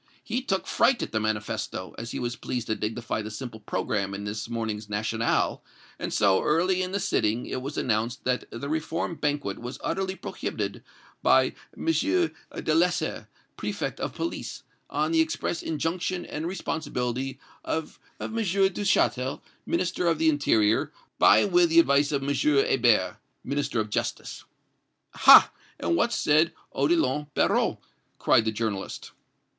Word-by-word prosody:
He 240 +3 -2
took 190 -7 -1
fright 250 -2 +2
at - - -5
the 110 - 0
manifesto, 110 -1 -3
as 115 +1 -6
he - - -4
was 120 -1 -2
pleased 120 -1 -4
to 110 - -1
dignify 110 +1 -3
the 105 - -6
simple 110 0 -7
programme 100 -2 -2
in 100 - -6
this 105 +2 -4
morning's 110 -3 -3
'National,' 110 +2 0 0.4
and - - -3
so, 100 -3 +3
early 180 +4 +2
in 185 0 -2
the 200 - -1
sitting, 115 - 0
it 130 - -4
was 140 +3 -6
announced 115 +2 -1
that 125 0 0
the 130 +4 -6
reform 160 +3 -2
banquet 145 -10 -2
was 125 +2 -6
utterly 190 0 -1
prohibited - - -4 0.4
by - - +4 0.2
M. - - -6
Delessert, 300 - 0 0.3
Préfect - - -3
of - - -4
Police, 335 - -4 0.3
on - - 0
the 325 -1 +4
express 320 - -2
injunction 175 +3 -2
and 155 +2 -4
responsibility 135 -7 -3 0.2
of 160 -1 -4 0.2
M. 225 - -4
Duchatel, 190 - +1 0.2
Minister 180 0 0
of 165 -2 +2
the 160 0 +3
Interior, 110 -8 +2 0.3
by 110 - +7
and 200 - 0
with 175 -1 +5
the 165 +1 +6
advice 145 -2 +4
of 140 -2 -1
M. 140 +1 0
Hebert, 135 -6 +3 0.3
Minister 140 -4 -1
of 105 -1 -2
Justice." - - -3 0.7
"Ha! - - +8 0.3
and 85 0 +1
what 85 - +2
said 155 +3 +3 0.2
Odillon 320 - +1
Barrot?" - - +2 0.4
cried 115 - +3
the 110 - +1
journalist. 105 -3 -4
140 Hz, 150 wpm, -26 LUFS, 110-175 Hz, 0.7 s, Ha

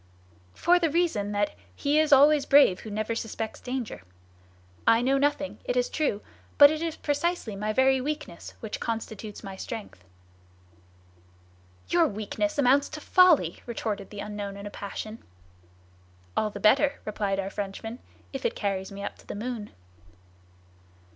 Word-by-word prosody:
"For 355 +1 +4
the 330 -2 +2
reason 300 -11 0
that 205 0 0 0.2
'he 290 +2 +2
is 310 -1 +2
always 285 +1 +6
brave 275 -10 +6
who 220 - -9
never 215 +2 -2
suspects 225 -1 -4
danger.' 250 - -5 0.9
I 230 +1 +5
know 270 +2 +3
nothing, 290 0 0
it - - -1
is - - +1
true; 280 -10 -1 0.3
but 285 0 +9
it 310 0 -3
is 330 -1 -2
precisely 290 - -1
my 210 +2 -2
very 260 +3 +3
weakness 290 - -5
which 220 - -5
constitutes 220 -2 -5
my 195 -1 -7
strength." 205 - -7 1.9
"Your 340 -2 +4
weakness 220 +9 -3
amounts 280 +1 +4
to 310 - -7
folly," 320 - +4
retorted 215 -4 -4
the 205 -1 -7
unknown 205 -1 -5
in 200 - -8
a 205 - -6
passion. 215 +3 -6 1.2
"All 215 - +1
the - - -8
better," 275 +6 +4
replied 200 -2 -1
our 195 0 -3
Frenchman, 210 +4 -5 0.3
"if 270 - -5
it - - 0
carries 195 -2 -2
me 200 0 -7
up - - -6
to - - -19
the - - -5
moon." 220 -1 -4
230 Hz, 155 wpm, -27 LUFS, 205-290 Hz, 1.9 s, but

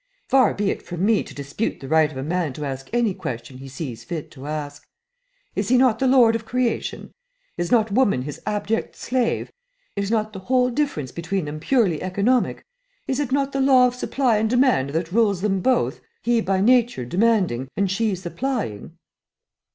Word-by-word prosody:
"Far 260 -4 +4
be 200 -1 0
it - - -5
from 175 +1 -3
me 220 -1 +3
to - - -10
dispute 145 +10 -3
the 135 - -8
right 160 +1 +4
of 135 - -9
a 130 - -3
man 165 -2 -1
to 150 +2 -5
ask 135 -1 -5
any 235 -4 +1
question 125 -3 -6
he 135 - -9
sees 130 -3 -6
fit 165 -4 -6
to 135 0 -10
ask. 145 -1 -5 0.7
Is 200 +1 -1
he 255 - +5
not 245 -3 +3
the 265 - +2
lord 250 -3 +6
of 230 - -3
creation? 245 +1 -2 0.4
Is 175 - -3
not 225 -3 +3
woman 200 - +2
his 145 +1 -7
abject 210 +1 -2
slave? 250 -2 -1 0.4
I 200 - -1
not 215 -1 0
the 190 - -6
whole 250 +5 +1
difference 235 - -2
between 175 +1 -3
them 150 +1 -5
purely 195 - +1
economic? 200 +7 0 0.4
Is 265 0 -1
it 285 -3 -2
not 275 0 +1
the 275 - -1
law 265 -2 +6
of 250 - +1
supply 250 -2 +1
and 220 +1 +1
demand 245 - +3
that 165 +3 -2
rules 205 -3 +2
them 195 -2 +1
both, 180 - +1 0.2
he 235 0 +2
by 190 -2 0
nature 240 - +3
demanding 185 - +1
and 195 -1 +1
she 210 0 0
supplying?" 185 - -4
205 Hz, 190 wpm, -23 LUFS, 155-245 Hz, 0.7 s, lord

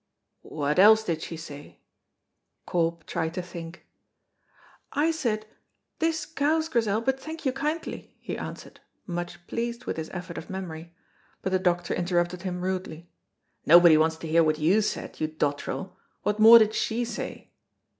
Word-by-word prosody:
"What 150 +2 -1
else 220 +3 +7
did 165 -6 -2
she 165 - -6
say?" 145 -3 -10 0.9
Corp 170 -1 -1
tried 160 +1 -3
to 180 - -1
think. 170 0 -9 1.1
"I 305 +3 +2
said, 230 -9 -2 0.5
'This 325 0 0
cows, 315 +1 0
Grizel, 225 -5 +1
but 265 +3 0
thank 315 +3 -8
you 260 - +1
kindly,'" 300 +5 -4
he - - -5
answered, - - -8 0.3
much 175 -1 -5
pleased 235 +3 -4
with - - -3
his 160 -1 -4
effort 180 -1 -6
of - - -12
memory, 170 -3 -6 0.5
but 190 - -1
the 185 - +2
doctor 175 -1 0
interrupted 175 0 0
him 180 -1 -4
rudely. 180 -3 -4 0.5
"Nobody 170 0 +8
wants 160 +1 +3
to 160 - -8
hear 165 +1 +4
what 155 -1 +2
you 175 +8 +3
said, 210 - -4
you 155 - +1
dottrel; 155 +4 -3 0.3
what 210 +1 0
more 225 +2 +10
did 215 -1 +4
she 235 +2 -1
say?" 235 - -6
180 Hz, 155 wpm, -27 LUFS, 165-230 Hz, 1.1 s, more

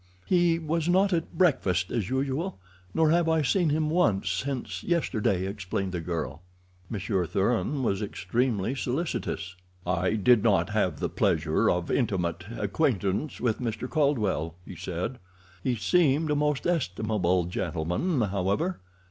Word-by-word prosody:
"He 175 -2 +3
was 165 +1 -1
not 190 +2 +4
at 165 -1 -2
breakfast 95 - +2
as 110 -6 -1
usual, 135 +7 -1 0.3
nor 155 +7 +3
have 170 0 +3
I 160 -1 +3
seen 170 +4 +2
him 155 +1 +1
once 105 - +2
since 130 +8 -3
yesterday," 110 - 0
explained 95 -1 -3
the 90 -2 -3
girl. 80 -2 -4 0.5
Monsieur 95 -4 -1
Thuran 125 - 0
was 100 -4 0
extremely 110 +2 -1
solicitous. 130 - -3 0.3
"I 90 +3 +1
did 110 +2 +5
not 105 -1 +2
have 95 -8 0
the - - 0
pleasure 80 0 +1
of 90 -1 0
intimate 90 -8 0
acquaintance 105 - 0
with 115 -3 0
Mr. 115 0 -3
Caldwell," 110 - 0
he 95 - -9
said. 90 +8 -4 0.4
"He 125 - +1
seemed 155 - +2
a - - +2
most 150 -1 0
estimable 105 - +1
gentleman, 90 - -1
however. 100 - 0
110 Hz, 140 wpm, -27 LUFS, 95-150 Hz, 0.5 s, did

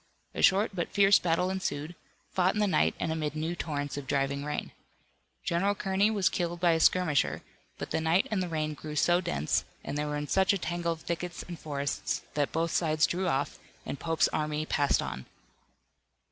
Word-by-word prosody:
A - - -3
short 200 +3 +4
but 175 -3 -2
fierce 200 0 +5
battle 180 +2 +1
ensued, 175 -4 -3 0.4
fought 185 +1 +2
in - - 0
the 210 - +3
night 180 -6 +2
and 160 - -1
amid 155 -2 -2
new 160 +3 -2
torrents 145 -4 -3
of 140 -2 -6
driving 140 0 0
rain. 150 0 -3 0.7
General 195 +4 +1
Kearney 195 +1 +2
was 205 -4 +2
killed 175 -1 -1
by 175 -1 +4
a 165 - +2
skirmisher, 160 -4 +2 0.3
but - - -6
the - - 0
night 165 +4 +2
and 205 -3 +1
the 180 - -2
rain 155 -1 -1
grew 150 0 -7
so 175 +4 +3
dense, 75 - 0 0.2
and - - -4
they 150 0 -1
were 150 0 -2
in 150 0 -4
such 190 +4 +3
a - - +1
tangle 170 -1 -2
of 160 - -12
thickets 175 +1 -4
and 175 -3 -8
forests 140 -2 -2
that 145 -1 0
both 165 +1 0
sides 155 -2 +2
drew 185 +2 -1
off, 140 -3 -1 0.3
and 140 - -5
Pope's 165 -1 +2
army 150 0 -1
passed 145 -2 +2
on. 65 0 -6
165 Hz, 200 wpm, -29 LUFS, 150-180 Hz, 0.7 s, fierce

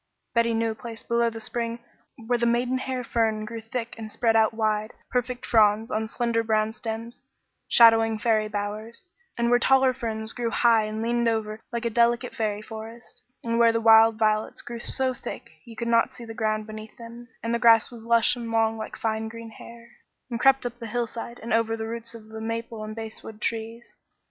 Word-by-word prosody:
Betty 235 -1 +2
knew 225 0 +1
a - - -4
place 225 0 -9
below 235 0 +1
the 225 0 -8
spring 230 +1 -3 0.5
where 240 +1 +1
the 235 - +2
maidenhair 250 +2 0
fern 220 -2 0
grew 230 +1 -6
thick 230 +1 -5
and 215 -1 -7
spread 225 0 +1
out 220 -1 +4
wide, 215 -1 -1 0.2
perfect 250 0 -2
fronds 220 +1 +3
on 220 +1 -1
slender 235 0 0
brown 220 -1 +1
stems, 225 +1 -6 0.5
shading 225 -2 +6
fairy 215 -1 +1
bowers; 210 - -5 0.3
and 235 0 +1
where 245 - +5
taller 265 +1 +4
ferns 220 -3 -4
grew 240 -1 -2
high 230 -2 +3
and 215 +1 -4
leaned 235 0 +1
over 220 -1 -1
like 235 0 -3
a 235 - 0
delicate 235 +2 +2
fairy 210 -1 -2
forest; 225 +2 -10 0.2
and 230 0 0
where 230 -1 +6
the 230 - 0
wild 225 0 +7
violets 215 -1 0
grew 235 -1 -7
so 260 +2 -1
thick - - -8
you 230 -2 -11
could 235 +1 -4
not 230 0 +3
see 240 - -10
the 225 - -8
ground 215 -1 -1
beneath 215 0 -10
them, 235 +1 -11 0.2
and 230 0 -1
the 235 - +1
grass 230 -1 +5
was 235 -2 -10
lush 235 +1 +4
and 235 -2 -6
long 225 -1 +1
like 220 - -6
fine 220 0 -2
green 230 0 -9
hair, 235 +1 -13 0.4
and 235 - -2
crept 270 0 +4
up 240 0 -5
the 230 - -6
hillside 235 +1 -4
and 230 - -2
over 225 0 +1
the 220 - -4
roots 230 +1 -6
of 220 -1 -12
the 220 0 -8
maple 230 0 -4
and 215 0 -6
basswood 220 -1 -8
trees. 230 +1 -4
230 Hz, 200 wpm, -25 LUFS, 220-235 Hz, 0.5 s, wild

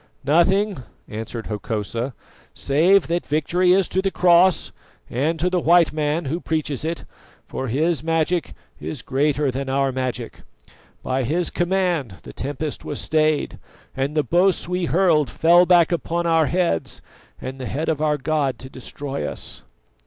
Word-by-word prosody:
"Nothing," 185 +5 +3 0.3
answered 110 +1 -6
Hokosa, 110 +3 -3 0.4
"save 170 +7 +3
that 170 +2 -1
victory 175 +5 +1
is 190 0 +3
to 190 - 0
the 195 - 0
Cross, 180 -1 +4 0.4
and 155 +7 0
to 175 - +1
the 180 0 +1
white 170 -1 +4
man 155 +2 -1
who 155 +6 -2
preaches 155 -4 -2
it, 165 +1 -4 0.4
for 130 - -5
his 155 +6 0
magic 165 +1 0 0.3
is 150 - -6
greater 145 +1 +1
than 135 +1 -4
our 135 0 +1
magic. 130 -2 -4 0.6
By 130 0 -1
his 165 +8 -1
command 175 - 0
the - - -10
tempest 145 +3 -4
was 145 - -5
stayed, 155 -1 0 0.4
and 140 +3 -2
the 150 - +3
boasts 175 +7 +2
we 180 0 -1
hurled 165 -4 +3
fell 175 +2 +4
back 175 -2 +5
upon 170 0 -1
our 165 -2 +3
heads 175 - -1 0.4
and 130 +1 -7
the 130 - -5
head 155 +4 -3
of 155 -2 0
our 150 -1 +2
god 145 -2 -1
to 130 +1 -11
destroy 135 - -5
us." - - -7
155 Hz, 155 wpm, -22 LUFS, 135-175 Hz, 0.6 s, back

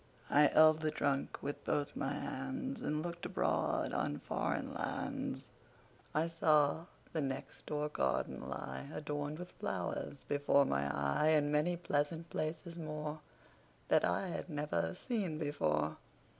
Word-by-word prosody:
I 145 +1 +7
held 155 +2 +7
the 155 - +2
trunk 140 -2 0
with 145 - -3
both 145 -1 0
my 135 +1 -1
handsAnd 150 - -3
looked 170 0 -4
abroad - - +1
on 75 - 0
foreign - - -2
lands.I 155 +2 -4
saw 160 -2 +3 0.3
the 160 - +1
next 135 -1 -4
door 150 0 0
garden 65 - -1
lie, 65 - -5
Adorned 150 0 -3
with 180 +1 -7
flowers, 140 - -3
before 145 0 +4
my 70 - +1
eye, 70 - +1
And 150 -2 +4
many 155 +4 +2
pleasant 165 +1 -1
places 165 +2 -3
moreThat 150 -1 -3
I 90 - +1
had 175 - -4
never 145 - -1
seen 195 -10 -1
before. 80 - 0
150 Hz, 130 wpm, -35 LUFS, 140-155 Hz, 0.3 s, I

